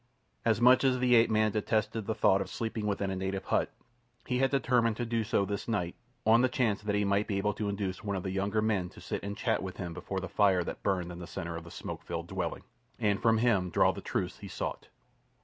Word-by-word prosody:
As 110 -2 +2
much 125 +2 +6
as 130 -1 +3
the 125 0 +3
ape 115 -1 +6
man 110 0 +3
detested 110 0 -1
the 110 - -1
thought 100 -3 +4
of - - -4
sleeping 110 -2 -3
within 100 -1 -1
a - - -2
native 95 +1 -3
hut, - - +1 0.6
he 125 -1 0
had 135 0 +3
determined 120 -5 +2
to 120 - -1
do 115 -1 0
so 100 -1 +1
this 100 0 -4
night, 95 -7 -1 0.3
on 115 +2 +6
the 130 - +3
chance 115 -5 0
that 105 0 -1
he 105 0 +2
might 100 +1 +1
be 100 - -1
able 105 +1 +1
to 105 -2 -2
induce 100 -1 -3
one 100 -2 -2
of 95 - -3
the 95 - -3
younger 100 +3 0
men 100 -5 0
to - - -14
sit - - -4
and 100 0 -5
chat 115 -2 0
with 95 -1 -6
him 85 -3 -4
before 95 +3 -4
the 95 - -5
fire 95 -1 +3
that - - -6
burned 90 -3 -1
in 85 - -8
the 85 - -7
centre 85 -3 -5
of 85 0 -7
the - - -10
smoke - - -6
filled - - -5
dwelling, - - -3 0.3
and 100 -2 +1
from 115 -1 +4
him 110 -6 +2
draw - - +4
the - - -8
truths - - -3
he - - -8
sought. - - -5
105 Hz, 255 wpm, -30 LUFS, 95-115 Hz, 0.6 s, much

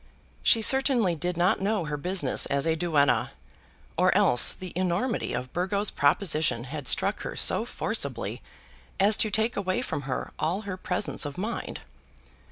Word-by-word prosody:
She 225 -2 +4
certainly 260 -7 +4
did 175 +2 -4
not 180 +2 +1
know 200 -3 -1
her 150 0 -4
business 175 -2 -1
as 140 +1 -1
a 160 -1 +1
duenna, 155 -4 +1 0.7
or - - +4
else 120 - +5
the 185 -2 -8
enormity 185 +7 -1
of 125 +1 -5
Burgo's 195 +3 -1
proposition 150 - +1
had 140 +1 -7
struck - - +1
her - - -6
so - - +2
forcibly - - -3 0.6
as 205 +2 +5
to 215 - +1
take 220 +4 0
away 185 -2 -2
from 145 - -4
her 125 - -4
all 175 +6 -1
her 200 -3 -6
presence 185 +2 -1
of 145 -2 -5
mind. 215 +6 -5
180 Hz, 160 wpm, -26 LUFS, 150-200 Hz, 0.7 s, else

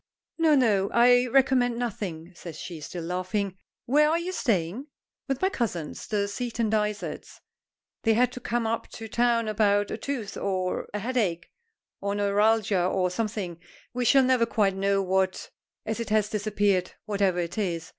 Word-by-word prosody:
"No, 320 -2 +5
no; 210 -7 +3
I 245 +1 +5
recommend 250 -2 +3
nothing," 190 -8 -4
says 170 -2 -9
she, 170 -4 -7
still 170 +3 -6
laughing. 185 +3 -2 0.3
"Where 300 +4 +4
are 325 - +2
you 345 +2 -3
staying?" 225 - -1 0.4
"With 270 -1 -1
my 380 - +4
cousins, 180 - -3
the 205 -2 0
Seaton 230 0 -2
Dysarts. 210 -1 -2 0.6
They 225 -1 +3
had 250 +1 +3
to 250 - -7
come 240 -1 -1
up 225 +1 -2
to 225 - -7
town 235 0 +1
about 205 -1 +2
a - - -3
tooth, 255 -8 -4
or 185 -2 -2
a 210 - -3
headache, 205 -7 -1 0.5
or 200 0 -2
neuralgia, 205 -1 +2
or 180 0 +1
something; 200 -4 -3 0.3
we 250 0 -1
shall 270 +3 +5
never 255 -2 +3
quite 200 -4 +1
know 195 0 +1
what, 190 0 0 0.3
as 220 +1 -3
it 230 - -4
has 215 -1 +2
disappeared, 205 -3 0
whatever 200 -3 +1
it 175 +4 -2
is. 170 -5 -2
210 Hz, 165 wpm, -27 LUFS, 190-240 Hz, 0.6 s, No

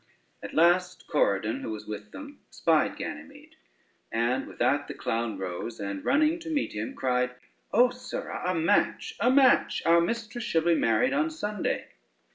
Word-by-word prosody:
At - - -8
last 180 +3 +3
Corydon, 110 - 0
who - - -5
was 110 -1 -6
with 105 0 -7
them, 290 0 -10
spied - - +1
Ganymede, 295 +3 -8 0.6
and 120 +4 0
with - - -12
that 145 +1 +1
the - - -7
clown 115 -2 -2
rose, 95 +5 -5
and, 100 -1 -4
running 305 +4 +2
to 330 -1 -8
meet 300 -3 -1
him, 105 +1 -4
cried: 125 -1 0 0.4
"O 245 +2 +5
sirrah, 250 0 -6
a 185 - 0
match, 165 +5 +1
a 230 +4 +3
match! 260 -1 +4
our 170 0 +5
mistress 230 +5 -3
shall 165 -5 +1
be 170 0 +4
married 250 - +2
on 305 +3 +1
Sunday." 210 - -3
170 Hz, 165 wpm, -27 LUFS, -, 0.6 s, O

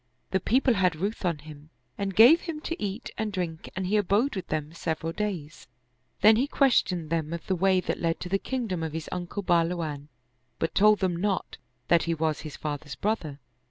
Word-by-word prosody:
The 190 - +2
people 255 +6 +3
had 185 -5 +2
ruth 200 +8 -3
on 170 -3 +1
him 150 0 -13 0.3
and 195 -1 -3
gave 250 - +8
him 330 -3 -5
to 330 -7 -4
eat 205 +2 -4
and 220 -1 -1
drink 175 -5 -4
and 190 0 -2
he 205 +4 +2
abode 210 +7 +2
with 185 -2 -5
them 155 0 -3
several 165 0 -3
days; 180 -8 -4 0.5
then 215 +2 +7
he 260 +4 +1
questioned 185 - +2
them 165 -1 -1
of 170 - -5
the 190 - 0
way 190 +1 +3
that - - -3
led 165 -1 0
to 180 - -5
the 195 +1 +1
kingdom 225 -10 -3
of 160 -2 -3
his 160 -1 -5
uncle 180 +3 -4
Bahluwan, 165 -5 0 0.5
but 165 - -2
told 210 0 +5
them 185 -2 +1
not 190 +2 -2 0.3
that 170 -1 +4
he 165 0 0
was 155 -2 0
his 155 -3 -8
father's 145 -1 -5
brother. 170 -9 -2
180 Hz, 200 wpm, -27 LUFS, 160-210 Hz, 0.5 s, gave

